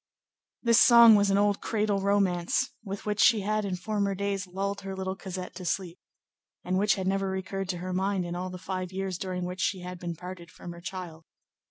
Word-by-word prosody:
This 230 Hz, -1 st, +5 dB
song 235 Hz, -2 st, +9 dB
was 205 Hz, -1 st, +4 dB
an 195 Hz, -, +3 dB
old 205 Hz, 0 st, +2 dB
cradle 210 Hz, -2 st, 0 dB
romance 195 Hz, +3 st, +1 dB
with 200 Hz, -1 st, -6 dB
which 210 Hz, -1 st, -2 dB
she 225 Hz, -4 st, +5 dB
had, 215 Hz, +2 st, 0 dB
in 190 Hz, -2 st, -2 dB
former 200 Hz, +1 st, -1 dB
days, 200 Hz, 0 st, -2 dB
lulled 195 Hz, +2 st, -3 dB
her 195 Hz, 0 st, -5 dB
little 190 Hz, 0 st, -3 dB
Cosette 185 Hz, -1 st, -6 dB
to 185 Hz, -, -7 dB
sleep, 180 Hz, 0 st, -2 dB, 0.6 s
and 185 Hz, +1 st, 0 dB
which 210 Hz, +1 st, +3 dB
had 190 Hz, -2 st, -3 dB
never 195 Hz, 0 st, 0 dB
recurred 190 Hz, 0 st, -4 dB
to 180 Hz, -, -1 dB
her 185 Hz, +1 st, -4 dB
mind 190 Hz, 0 st, 0 dB
in 175 Hz, 0 st, -4 dB
all 180 Hz, +1 st, -3 dB
the 180 Hz, -, -7 dB
five 185 Hz, 0 st, -4 dB
years 190 Hz, -1 st, -3 dB
during 180 Hz, -1 st, -3 dB
which 180 Hz, +1 st, -5 dB
she 190 Hz, -2 st, 0 dB
had 180 Hz, 0 st, -7 dB
been 170 Hz, -1 st, -4 dB
parted 180 Hz, 0 st, -9 dB
from 175 Hz, -, -10 dB
her 170 Hz, 0 st, -10 dB
child. 170 Hz, -3 st, -7 dB
190 Hz, 215 wpm, -28 LUFS, 180-200 Hz, 0.6 s, song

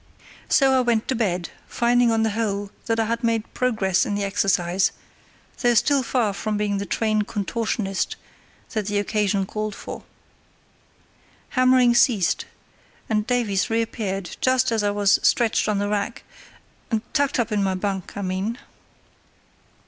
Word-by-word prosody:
So 270 Hz, -2 st, +4 dB
I 260 Hz, -, +4 dB
went 235 Hz, -3 st, +1 dB
to -, -, +2 dB
bed, 185 Hz, -7 st, -1 dB, 0.2 s
finding 240 Hz, 0 st, +2 dB
on 225 Hz, -1 st, +2 dB
the 220 Hz, -, +1 dB
whole 205 Hz, -2 st, -2 dB, 0.2 s
that 225 Hz, -1 st, +1 dB
I 225 Hz, -, +2 dB
had 230 Hz, +2 st, -2 dB
made 230 Hz, -1 st, -1 dB
progress 215 Hz, -7 st, +1 dB
in 210 Hz, -5 st, -2 dB
the 205 Hz, -, -1 dB
exercise, 195 Hz, -2 st, +1 dB, 0.7 s
though 240 Hz, -1 st, +3 dB
still 275 Hz, +4 st, +3 dB
far 235 Hz, -4 st, 0 dB
from 210 Hz, +1 st, -2 dB
being 205 Hz, -1 st, -1 dB
the 200 Hz, -, -4 dB
trained 215 Hz, -2 st, 0 dB
contortionist 210 Hz, -2 st, -2 dB, 0.6 s
that 215 Hz, -3 st, -2 dB
the 205 Hz, -1 st, 0 dB
occasion 205 Hz, -1 st, 0 dB
called 215 Hz, +1 st, -4 dB
for. -, -, -8 dB, 1.5 s
Hammering 255 Hz, -1 st, +4 dB
ceased, 230 Hz, -6 st, +2 dB, 0.6 s
and 215 Hz, 0 st, 0 dB
Davies 230 Hz, -6 st, 0 dB
reappeared 220 Hz, -4 st, -2 dB
just 255 Hz, -1 st, +2 dB
as 225 Hz, -1 st, +1 dB
I 205 Hz, -, +1 dB
was 205 Hz, -1 st, +3 dB
stretched 230 Hz, -2 st, +2 dB
on 210 Hz, -, +1 dB
the 205 Hz, 0 st, 0 dB
rack—tucked 230 Hz, +5 st, -4 dB
up 235 Hz, -1 st, 0 dB
in 210 Hz, -1 st, +1 dB
my 190 Hz, -1 st, 0 dB
bunk, 190 Hz, 0 st, -4 dB
I 200 Hz, -, -3 dB
mean. 190 Hz, +5 st, -2 dB
215 Hz, 150 wpm, -23 LUFS, 200-235 Hz, 1.5 s, So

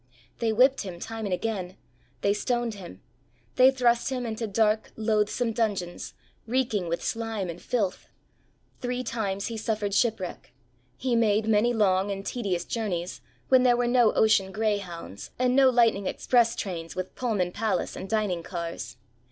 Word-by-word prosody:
They 230 Hz, -1 st, +1 dB
whipped 260 Hz, +5 st, +4 dB
him 180 Hz, -3 st, -7 dB
time 225 Hz, +2 st, -5 dB
and 200 Hz, -, -3 dB
again; 190 Hz, -2 st, -3 dB, 0.4 s
they 200 Hz, -, +3 dB
stoned 240 Hz, +2 st, -1 dB
him; 175 Hz, -, -11 dB, 0.5 s
they 255 Hz, +1 st, +7 dB
thrust 245 Hz, -3 st, +2 dB
him 255 Hz, -2 st, -3 dB
into 225 Hz, 0 st, -3 dB
dark, 215 Hz, +1 st, +1 dB
loathsome 220 Hz, +2 st, 0 dB
dungeons, 200 Hz, -6 st, -2 dB, 0.3 s
reeking 225 Hz, -6 st, 0 dB
with 170 Hz, -, -2 dB
slime 225 Hz, -5 st, -2 dB
and 170 Hz, -, -11 dB
filth; 205 Hz, -7 st, -2 dB, 0.7 s
three 250 Hz, 0 st, -2 dB
times 205 Hz, -4 st, -2 dB
he 230 Hz, -, -4 dB
suffered 215 Hz, -2 st, -2 dB
shipwreck, 205 Hz, -, -1 dB, 0.4 s
he 255 Hz, -2 st, 0 dB
made 220 Hz, -1 st, +2 dB
many 220 Hz, +2 st, +3 dB
long 200 Hz, -3 st, +2 dB
and 195 Hz, 0 st, -4 dB
tedious 195 Hz, -8 st, -2 dB
journeys 175 Hz, -, -3 dB, 0.3 s
when 260 Hz, -1 st, +6 dB
there 245 Hz, -1 st, +4 dB
were 245 Hz, -, +1 dB
no 240 Hz, -2 st, +4 dB
ocean 195 Hz, -3 st, +3 dB
greyhounds 195 Hz, -, -3 dB
and 250 Hz, 0 st, +2 dB
no 270 Hz, -1 st, +6 dB
lightning 230 Hz, -6 st, +3 dB
express 235 Hz, -2 st, +2 dB
trains 165 Hz, -5 st, -5 dB
with 185 Hz, 0 st, -4 dB
Pullman 205 Hz, -8 st, -1 dB
palace 215 Hz, +1 st, -1 dB
and 190 Hz, -, -7 dB
dining 210 Hz, -6 st, 0 dB
cars. 165 Hz, -8 st, -6 dB
215 Hz, 155 wpm, -27 LUFS, 190-235 Hz, 0.7 s, they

